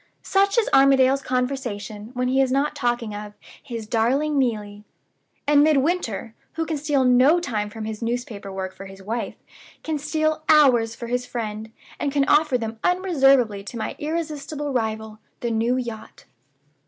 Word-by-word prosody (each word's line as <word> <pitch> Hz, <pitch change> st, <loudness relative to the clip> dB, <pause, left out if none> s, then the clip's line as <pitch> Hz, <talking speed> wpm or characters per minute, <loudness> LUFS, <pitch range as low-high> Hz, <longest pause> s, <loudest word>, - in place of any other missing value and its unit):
Such 395 Hz, +2 st, +2 dB
is 465 Hz, -, +3 dB
Armadale's 270 Hz, 0 st, +5 dB
conversation 245 Hz, -6 st, -3 dB
when 250 Hz, 0 st, 0 dB
he 265 Hz, +1 st, +3 dB
is 265 Hz, -1 st, +1 dB
not 275 Hz, +3 st, +1 dB
talking 240 Hz, -4 st, -1 dB
of 210 Hz, 0 st, -7 dB, 0.3 s
'his 230 Hz, -3 st, -6 dB
darling 270 Hz, +7 st, +1 dB
Neelie.' 210 Hz, -5 st, -2 dB, 0.6 s
And 290 Hz, 0 st, +5 dB
Midwinter, 290 Hz, -, +1 dB, 0.2 s
who 325 Hz, 0 st, -2 dB
can 315 Hz, -1 st, -2 dB
steal 285 Hz, -2 st, +1 dB
no 255 Hz, +7 st, +5 dB
time 215 Hz, -11 st, -2 dB
from 215 Hz, +1 st, -7 dB
his 220 Hz, 0 st, -5 dB
newspaper 230 Hz, -4 st, -4 dB
work 190 Hz, -1 st, -5 dB
for 195 Hz, -, -10 dB
his 195 Hz, 0 st, -12 dB
wife, 220 Hz, 0 st, -3 dB, 0.5 s
can 315 Hz, -2 st, -2 dB
steal 310 Hz, +1 st, 0 dB
hours 250 Hz, -7 st, +5 dB
for 235 Hz, -, -7 dB
his 245 Hz, +1 st, -2 dB
friend, 220 Hz, -2 st, -5 dB, 0.3 s
and 285 Hz, -, -1 dB
can 280 Hz, -1 st, +2 dB
offer 300 Hz, -4 st, +3 dB
them 225 Hz, -1 st, -5 dB
unreservedly 270 Hz, -, +3 dB
to 235 Hz, -, -7 dB
my 220 Hz, -, -4 dB
irresistible 300 Hz, -2 st, -3 dB
rival, 220 Hz, -2 st, -3 dB, 0.2 s
the 235 Hz, -, -1 dB
new 230 Hz, +3 st, +1 dB
yacht. 230 Hz, -3 st, -7 dB
250 Hz, 160 wpm, -23 LUFS, 220-290 Hz, 0.6 s, Armadale's